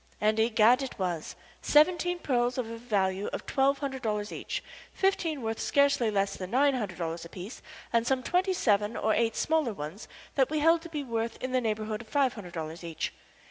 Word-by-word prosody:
And, 215 +1 +2
egad, 225 +2 +5
it 270 - -5
was: 175 -4 -3 0.3
seventeen 350 +3 +4
pearls 245 -6 0
of 250 -3 -1
a 230 - -6
value 200 -4 0
of - - -5
twelve 275 0 +2
hundred 270 -2 -4
dollars 210 -2 -2
each, - - -4 0.3
fifteen 335 -8 0
worth 225 0 -2
scarcely 280 -5 +3
less 200 -1 0
than 185 -1 -6
nine 275 +5 +4
hundred 210 -8 -3
dollars 165 -1 -3
apiece, 180 +6 -8 0.3
and 230 0 +2
some 260 -1 +1
twenty 370 +4 +1
seven 210 - +1
or 220 - +2
eight 225 -1 +1
smaller 310 -7 +1
ones 160 +4 -7 0.3
that 265 -2 +3
we 310 - -1
held 325 +2 +4
to 335 - -9
be 300 -3 -3
worth 230 -2 -2
in 255 - -4
the 255 0 +2
neighborhood 215 -1 -2
of 235 - -13
five 275 -2 +2
hundred 180 -6 -9
dollars 160 0 -5
each. 165 -1 -4
230 Hz, 200 wpm, -29 LUFS, 205-280 Hz, 0.3 s, egad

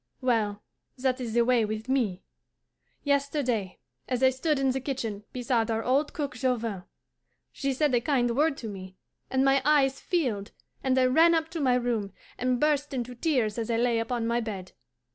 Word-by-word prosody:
Well, 220 -5 0 0.3
that 255 0 0
is 230 -2 -4
the 235 -1 +4
way 245 -2 +3
with 215 +2 -4
me. 230 -9 0 0.8
Yesterday, 280 -8 0 0.3
as 255 0 -1
I 260 - +6
stood 295 +4 0
in 270 -1 +2
the 265 - -1
kitchen 225 -6 -4
beside 240 -2 0
our 225 0 0
old 275 +5 +1
cook 295 -1 -3
Jovin, 230 -8 -1 0.7
she 275 - -2
said 280 +1 +1
a 240 - +3
kind 245 -4 +1
word 295 +1 +2
to 230 - -6
me, 190 -2 -8 0.3
and 265 0 +2
my 270 0 +4
eyes 275 -2 +3
filled, 240 - -1 0.3
and 260 -1 +2
I 260 - +5
ran 325 +6 +5
up 325 0 0
to 335 - -5
my 255 -3 +3
room, 235 -5 -1 0.3
and 250 0 +1
burst 295 -1 +1
into 250 0 -3
tears 245 -5 0
as 225 - -3
I 230 - +1
lay 235 -1 +2
upon 230 0 -2
my 235 +1 +1
bed. 200 -5 -5
250 Hz, 185 wpm, -27 LUFS, 225-275 Hz, 0.8 s, I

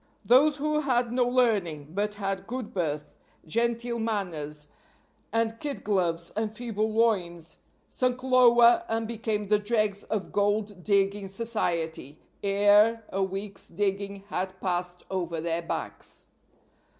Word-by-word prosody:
Those 285 +5 +6
who 300 +1 0
had 245 -5 +1
no 245 0 +2
learning, 205 - +1
but 205 +3 -1
had 195 -2 -3
good 245 -1 -5
birth, 150 -5 -3 0.3
genteel 235 +5 0
manners 165 -10 -3 0.6
and 225 0 0
kid 290 -2 -4
gloves 175 -5 0
and 220 -1 -1
feeble 220 -1 -2
loins, 185 -7 0 0.3
sunk 255 0 0
lower 245 +3 +6
and 225 0 -1
became 215 -3 -2
the 210 -1 +4
dregs 210 -2 0
of 215 -3 -3
gold 205 -1 0
digging 200 -1 +1
society 175 - -2 0.2
ere 205 +3 +4
a 195 - -2
week's 195 +1 -4
digging 200 +1 -2
had 185 0 -3
passed 180 -1 -2
over 175 -3 -2
their 165 +1 -1
backs. 165 - -6
205 Hz, 125 wpm, -27 LUFS, 185-230 Hz, 0.6 s, Those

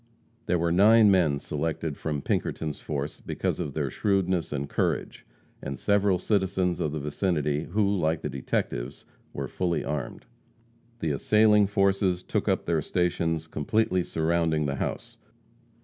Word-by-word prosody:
There 90 - +2
were 85 0 0
nine 105 +4 +6
men 85 -7 +3
selected 80 +1 -3
from 75 -2 -3
Pinkerton's 75 -2 -2
force 75 0 -4
because - - -2
of 70 - -4
their 70 -4 -1
shrewdness 95 -4 0
and 70 -1 -3
courage, - - -2 0.3
and 70 -1 -5
several 100 +1 +2
citizens 95 -2 0
of 75 - -1
the 75 - -3
vicinity 75 0 -1
who, 100 +2 +1
like 80 -1 0
the - - -3
detectives, 65 -1 -3 0.3
were - - -4
fully 90 -2 -1
armed. 70 -1 -4 0.8
The 80 - 0
assailing 105 +7 +4
forces 95 -2 +1
took - - -2
up - - 0
their 85 -2 +1
stations 80 -1 -1
completely 90 +5 0
surrounding 80 -2 0
the 70 -1 -2
house. - - -5
85 Hz, 145 wpm, -27 LUFS, 75-95 Hz, 0.8 s, nine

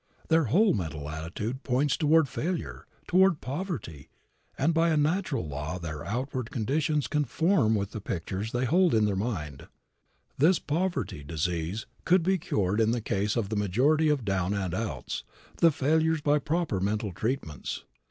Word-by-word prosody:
Their 160 -2 +4
whole 195 - +4
mental 80 -7 -4
attitude 85 - -4
points 135 +2 +1
toward 155 0 +4
failure, 170 +7 -4 0.2
toward 185 -3 +4
poverty, 130 - -5 0.5
and 160 +5 +2
by 165 +1 +3
a 160 - +2
natural 155 - 0
law 75 +4 -4
their 80 -4 -6
outward 125 +1 -3
conditions 145 +4 0
conform 150 - +2
with 100 -1 -2
the 110 - -6
pictures 95 +4 -4
they 125 +1 0
hold 175 +2 +3
in 110 -1 +4
mind. 85 - -4 0.7
This 165 +6 +5
poverty 145 - -2
disease 85 +6 -2 0.2
could 180 0 +4
be 190 +1 +2
cured 100 - 0
in 110 - +3
the 120 +1 +1
case 105 -1 -1
of 110 -5 -1
the 110 - -2
majority 130 - +2
of 140 -6 0
down 95 0 0
and 95 -4 -2
outs, 95 - -3 0.3
the 170 - +6
failures, 160 +2 +2
by 145 0 +3
proper 160 - -1
mental 105 0 -1
treatments. 110 - -3
120 Hz, 155 wpm, -28 LUFS, 95-155 Hz, 0.7 s, the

